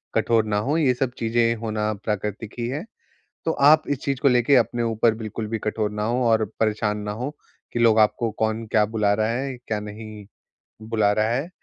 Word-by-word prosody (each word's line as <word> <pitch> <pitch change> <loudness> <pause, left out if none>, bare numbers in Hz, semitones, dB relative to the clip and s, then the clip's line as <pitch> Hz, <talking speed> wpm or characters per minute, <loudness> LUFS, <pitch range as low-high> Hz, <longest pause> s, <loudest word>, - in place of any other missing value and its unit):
कठोर 115 -2 +2
ना 105 -1 0
हों। 150 +3 +1
ये 140 -6 +3
सब 125 0 -1
चीज़ें 115 0 +2
होना 110 -1 -1
प्राकृतिक 105 +1 -4
ही 120 - -1
है। 140 +6 -3 0.6
तो 160 - +2
आप 155 +1 +5
इस 140 -2 -1
चीज़ 140 -2 -1
को 140 - +4
लेके 125 +1 +4
अपने 120 0 +2
ऊपर 115 0 +2
बिल्कुल 110 0 -5
भी 115 +1 -3
कठोर 105 0 -2
ना 105 0 -3
हों 120 +3 0
और 110 -1 +3 0.2
परेशान 105 -1 0
ना 105 0 -4
हो 125 +6 -4 0.4
कि - - -1
लोग 115 -2 +5
आपको 110 +2 +2
कौन 110 +1 0
क्या 110 -1 +3
बुला 105 -1 +1
रहा 110 +1 +1
है, 130 +3 -2
क्या 110 -3 -4
नहीं 105 0 -9 0.6
बुला 110 -3 +2
रहा 110 +1 +1
है। 135 +6 -1
110 Hz, 205 wpm, -23 LUFS, 105-120 Hz, 0.6 s, आप